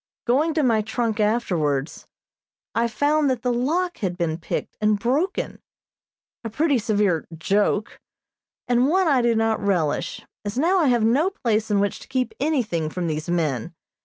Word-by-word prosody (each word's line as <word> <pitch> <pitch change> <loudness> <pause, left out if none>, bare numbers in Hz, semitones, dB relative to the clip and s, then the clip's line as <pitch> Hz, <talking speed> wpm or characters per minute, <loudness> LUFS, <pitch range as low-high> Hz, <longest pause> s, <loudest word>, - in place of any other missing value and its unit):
Going 300 +6 +2
to 310 - +2
my 230 -4 +3
trunk 220 0 -2
afterwards, 165 - 0 0.7
I 235 +1 +1
found 290 +5 +1
that 250 -3 -2
the 250 -1 +1
lock 335 +9 -1
had 180 -4 -2
been 165 -2 -1
picked 165 - -4
and 210 0 +3
broken, 280 - -1 0.8
a 225 - -4
pretty 285 +3 +1
severe 205 -7 +1
"joke," 205 +4 0 0.7
and 245 +1 +3
one 370 +4 +2
I 275 -5 +4
do 235 -1 +2
not 225 0 +1
relish, 175 -7 -1 0.2
as 205 +3 -5
now 350 +7 +3
I 320 - +3
have 240 -3 +3
no 270 +11 +3
place 225 - -1
in 205 -1 +2
which 200 0 -1
to - - -13
keep 260 - -1
anything 225 - 0
from 180 +2 -4
these 155 0 -3
men. 165 -3 -1
225 Hz, 165 wpm, -23 LUFS, 195-265 Hz, 0.8 s, I